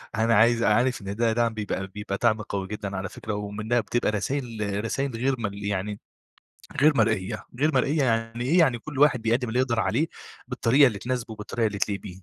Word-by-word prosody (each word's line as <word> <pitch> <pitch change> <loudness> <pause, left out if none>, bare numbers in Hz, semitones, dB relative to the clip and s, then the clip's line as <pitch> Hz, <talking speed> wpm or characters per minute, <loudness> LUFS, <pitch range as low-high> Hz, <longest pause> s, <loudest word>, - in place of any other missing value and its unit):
أنا 115 0 +3
عايز 115 +2 +4
عارف 120 +4 +2
إن 100 +1 -5
ده 115 0 +1
دعم 115 0 +1
بيبقى 100 -2 -3
بيبقى 100 0 -5
دعم 110 -2 +3
قوي 100 -2 -4
جدًا 100 -2 -5
على 95 0 -4
فكرة، 110 - -6
ومنها 105 +3 -1
بتبقى 120 0 0
رسايل 105 -3 -2
رسايل 135 +1 -2
غير 130 +3 +1
م 105 -3 -1
يعني 100 0 -3 0.8
غير 150 -1 +5
مرئية، 110 -4 0
غير 155 +1 +2
مرئية 140 +3 +2
يعني 115 0 0
إيه؟ 170 +7 +3
يعني 130 -8 +3
كل 140 +1 -7
واحد 135 -5 +4
بيقدم 120 +3 +1
اللي 125 +3 0
يقدر 120 -3 +1
عليه 150 +8 +1 0.4
بالطريقة 135 +4 +4
اللي 105 -4 -3
تناسبه 125 -2 -3
وبالطريقة 110 +1 -2
اللي 100 -1 -4
تليق 100 -2 -1
بيه. 100 - -8
115 Hz, 195 wpm, -25 LUFS, 105-125 Hz, 0.8 s, غير